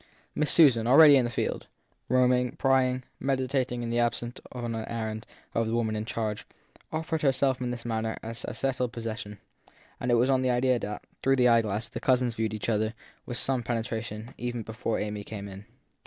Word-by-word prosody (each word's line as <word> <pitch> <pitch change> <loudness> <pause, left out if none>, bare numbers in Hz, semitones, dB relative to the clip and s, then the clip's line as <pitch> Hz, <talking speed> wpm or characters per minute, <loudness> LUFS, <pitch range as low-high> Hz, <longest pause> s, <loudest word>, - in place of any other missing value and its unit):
Miss 150 -1 +1
Susan, 125 -9 +6
already 145 +3 +9
in 130 -3 +4
the - - -1
field, 115 - -3 0.4
roaming, 125 -1 +3
prying, 130 -1 +2 0.2
meditating 130 -2 -1
in 115 - -3
the 120 - +1
absence 120 0 -1
on 120 -2 -4
an 110 0 -3
errand 110 -1 -4 0.3
of 115 -1 +1
the 115 - -1
woman 110 -2 0
in 105 0 -3
charge, 110 -2 -3 0.4
offered 160 0 -2
herself 135 -2 +2
in 125 - -1
this 120 -1 -5
manner 110 -1 -2
as 115 +1 -6
in - - -4
settled 130 -3 -1
possession; 110 -2 -5 0.6
and 125 - -2
it 120 - +5
was 120 +2 +3
on 130 -1 +3
that 130 - +1
idea 125 0 +2
that, 105 -1 -5 0.2
through 135 0 +3
the 125 -2 +4
eyeglass, 115 -2 +2
the - - -6
cousins 125 -2 +2
viewed 110 -1 -2
each 105 - -5
other 110 0 0 0.3
with 120 - -3
some 130 -2 +1
penetration 115 0 -4
even 120 -1 -3
before 110 +1 -3
Amy 105 -1 -3
came 100 -1 -7
in. 100 +1 -10
120 Hz, 195 wpm, -28 LUFS, 110-130 Hz, 0.6 s, already